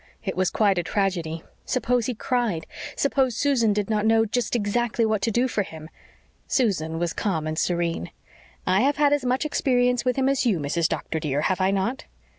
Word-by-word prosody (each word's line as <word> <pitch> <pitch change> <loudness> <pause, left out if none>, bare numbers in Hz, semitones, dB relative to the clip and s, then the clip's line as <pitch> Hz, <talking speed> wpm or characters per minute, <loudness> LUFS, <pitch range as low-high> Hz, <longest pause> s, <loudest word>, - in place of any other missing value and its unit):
It 190 - -3
was 185 0 +1
quite 200 -4 +2
a - - -1
tragedy. 170 -4 -1 0.2
Suppose 245 -2 0
he 250 - -2
cried? 220 -9 -1 0.3
Suppose 265 -4 +1
Susan 260 -7 +2
did 205 -1 0
not 215 -2 0
know 225 0 +4
just 240 +2 -1
exactly 235 +2 0
what 215 -2 0
to 230 - +1
do 240 +4 +2
for 220 - -1
him? 160 -4 -8 0.6
Susan 165 - 0
was 170 -1 -1
calm 170 -8 -1
and 155 0 -2
serene. 170 - -1 0.6
"I 185 +2 +3
have 280 +3 +2
had 290 -1 +4
as 290 - +1
much 255 +3 0
experience 250 -4 +1
with 250 -2 +1
him 265 -1 +1
as 275 -1 +2
you, 225 -7 +2
Mrs. 160 +3 0
Doctor, 160 - -3
dear, 145 -2 -1
have 185 +4 0
I 190 - +3
not?" 195 +7 -1
215 Hz, 200 wpm, -24 LUFS, 175-245 Hz, 0.6 s, know